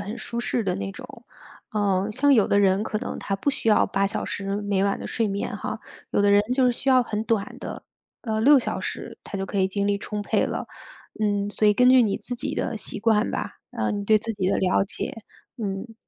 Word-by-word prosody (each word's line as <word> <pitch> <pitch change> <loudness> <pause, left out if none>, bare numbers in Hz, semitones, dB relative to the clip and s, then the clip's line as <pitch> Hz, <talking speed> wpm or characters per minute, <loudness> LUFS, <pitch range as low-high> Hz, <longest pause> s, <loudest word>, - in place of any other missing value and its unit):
很 205 +2 -6
舒 235 - -4
适 240 -1 -1
的 185 -2 0
那 100 0 -4
种， - - -11 0.5
呃， 200 -1 +1
像 285 +6 +3
有 215 - +4
的 200 - +3
人 195 0 +3
可 215 -1 -2
能 - - -5
他 195 - -2
不 285 - 0
需 230 - -2
要 210 - +5
8 195 0 0
小 205 - -3
时 200 - -5 0.2
每 200 -1 +1
晚 200 0 +1
的 - - -6
睡 225 -3 -1
眠 200 0 -3
哈， - - -4 0.3
有 - - +1
的 205 - +4
人 205 0 +6
就 260 -1 +3
是 245 - +3
需 260 - -3
要 255 -1 +6
很 215 -2 -3
短 220 -4 -1
的， - - -7 0.4
呃， 220 -2 -1
6 275 +4 +7
小 - - -3
时 - - -6
他 200 - -6
就 195 - -3
可 200 - -3
以 190 0 +3
精 200 +1 -1
力 200 0 +2
充 210 +1 -5
沛 - - +1
了。 - - -3 0.5
嗯， 205 -1 +1
所 215 - +1
以 210 - +6
根 250 +2 +5
据 255 -1 +7
你 210 -4 +1
自 245 - -5
己 245 - -4
的 230 - -2
习 210 - -4
惯 220 0 +2
吧， - - -3 0.2
呃， - - -1
你 205 -1 -3
对 215 +1 +5
自 225 +1 -3
己 190 -3 -1
的 - - +2
了 185 0 +2
解， - - -5 0.4
嗯。 210 +1 -4
210 Hz, 255 characters per minute, -25 LUFS, 200-230 Hz, 0.5 s, 6